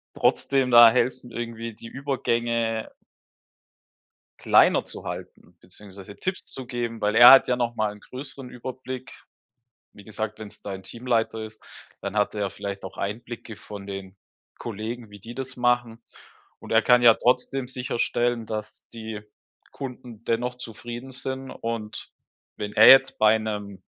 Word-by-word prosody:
trotzdem 135 -2 +2
da 120 -1 +10
helfen 125 0 -1
irgendwie 115 -1 -5
die 115 - -11
Übergänge 115 -4 -1 1.5
kleiner - - +4
zu - - -7
halten, 85 - -9
beziehungsweise 100 +1 -12
Tipps 185 0 -4
zu 130 - -8
geben, 120 -2 -4
weil 105 0 +1
er 120 +1 +11
hat 135 -1 +8
ja 125 - +2
nochmal 115 -3 -1
'n 105 - -13
größeren 135 +1 -9
Überblick. 130 +1 -7 0.8
Wie 100 - -15
gesagt, 110 0 -5
wenn 110 -1 -8
es - - -17
dein 95 -1 -7
Teamleiter 115 -2 -1
ist, 110 0 -12 0.4
dann 100 +1 -5
hat 105 0 +1
er 100 -1 -1
vielleicht 100 0 -6
auch - - -8
Einblicke 110 +1 -6
von 100 -1 -10
den 95 -1 -7 0.4
Kollegen, 115 0 -6
wie 105 - -12
die 115 +5 -10
das 135 0 -6
machen. 120 -2 +1 0.6
Und - - -11
er - - +4
kann 125 0 +5
ja 115 -2 +8
trotzdem 125 +2 0
sicherstellen, 120 -2 -1
dass 110 -1 -7
die 110 -2 -7 0.5
Kunden 125 -4 -9
dennoch 120 +2 -1
zufrieden 120 +2 -8
sind 130 0 -5
und 115 -3 -5 0.5
wenn 105 0 -5
er 110 - +7
jetzt 135 0 +7
bei 110 +1 +5
'nem 105 -3 -5
115 Hz, 150 wpm, -25 LUFS, 105-125 Hz, 1.5 s, er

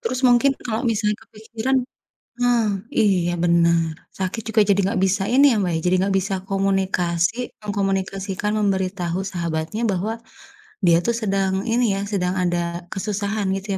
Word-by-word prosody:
Terus 455 - -2
mungkin 255 +2 +4
kalau 220 -2 -2
misalnya 210 -1 0
kepikiran 225 +3 -3 0.6
ah, 240 -3 +3 0.3
iya 180 -4 +2
benar. 170 -1 +3 0.2
Sakit 190 +4 -3
juga 225 -1 +4
jadi 200 -1 +2
enggak 195 -1 0
bisa 195 +1 +2
ini 275 +3 +5
ya, - - +1
Mbak, 180 -2 0
ya, - - 0
jadi 180 +1 +3
enggak 195 +1 +1
bisa 195 0 0
komunikasi, 195 +2 0
mengkomunikasikan, 195 -1 -2
memberi 195 -3 +1
tahu 180 -2 -3
sahabatnya 170 +3 -3
bahwa 195 +4 -1 0.7
dia 170 -3 +5
tuh 235 - +2
sedang 195 -2 0
ini 240 +2 +2
ya, 195 - -2
sedang 180 -3 0
ada 175 -1 -1
kesusahan 205 +1 -2
gitu 195 0 -3
195 Hz, 155 wpm, -22 LUFS, 180-220 Hz, 0.7 s, ini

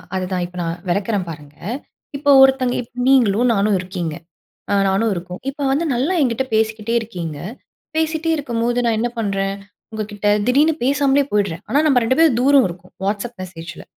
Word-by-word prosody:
அதுதான். 185 -1 -2
இப்ப 180 +1 -11
நான் 165 +1 -4
வெளக்குறேன் 200 0 -1
பாருங்க. 150 -2 -10 0.6
இப்போ, 285 +1 -1
ஒருத்தங்க 265 -2 +3
இப்ப 245 +1 -8
நீங்களும், 245 -3 +4
நானும் 205 0 +2
இருக்கோம். 180 -4 -4 0.6
அ - - +2
நானும் 200 +4 +1
இருக்கேன். 180 +1 -7
இப்ப 285 +1 -8
வந்து 295 +5 +1
நல்லா 275 +10 0
என்கிட்ட 255 0 0
பேசிக்கிட்டே 220 +1 0
இருக்கீங்க. 175 -9 -6 0.6
பேசிட்டே 320 +1 0
இருக்கும்போது, 240 -4 -1
நான் 230 -2 +2
என்ன 240 +2 0
பண்ணுறேன்? 195 -2 -1 0.4
உங்க 220 0 -2
கிட்ட, 205 0 -3 0.2
திடீர்னு 290 +6 +4
பேசாமலே 280 +1 +3
போயிடுறேன். 200 -4 -1
ஆனா, 275 +6 +3
நம்ப 260 -4 +4
2 260 +4 +1
பேரும் 320 -7 +5
தூரம் 275 0 +5
இருக்கோம். 180 +1 -11
WhatsApp 210 +4 -2
மெசேஜில. 175 -1 -9
220 Hz, 165 wpm, -20 LUFS, 185-265 Hz, 0.6 s, பேரும்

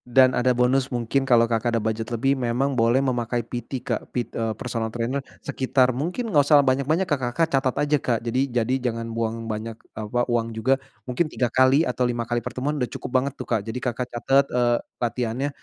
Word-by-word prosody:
Dan 130 -1 +7
ada 125 +1 +2
bonus 130 +2 +2
mungkin 125 +2 0
kalo, 115 -1 +6
Kakak 115 0 0
ada 115 - -1
budget 110 +1 -2
lebih 120 +4 +1
memang 130 +2 0
boleh 120 +2 +3
memakai 120 -2 -1
PT 125 +1 -6
Kak, - - -1
pit 120 -2 -3
eee, 115 -1 -1
personal 115 -3 -3
trainer. 120 +4 -2 0.2
Sekitar 130 -1 +2
mungkin 180 - -3
enggak 145 -1 +5
usah 145 -2 +6
banyak-banyak, 140 +8 +2
Kakak 130 -6 -1
Kakak 165 -1 +3
catat 130 -2 -1
aja, 150 0 +2
Kak. 120 -3 0
Jadi 130 +3 0
jadi 120 +1 0 0.2
jangan 115 0 -5
buang 115 0 -2
banyak 110 0 -4 0.2
apa, 110 +3 -2
uang 115 -2 0
juga. 135 +4 +2 0.2
Mungkin 150 +6 -1
3 125 - 0
kali 130 +5 +5
atau 125 0 -1
5 120 -1 -2
kali 120 +1 -1
pertemuan 145 +6 -3
udah 125 - 0
cukup - - -7
banget 140 0 -3
tuh, - - -6
Kak. 115 -3 +1
Jadi, 115 +2 -4
Kakak 125 0 -2
catat, 135 +3 +2
eee, 120 -1 +2 0.2
latihannya 120 +3 -1
125 Hz, 205 wpm, -24 LUFS, 115-135 Hz, 0.2 s, Dan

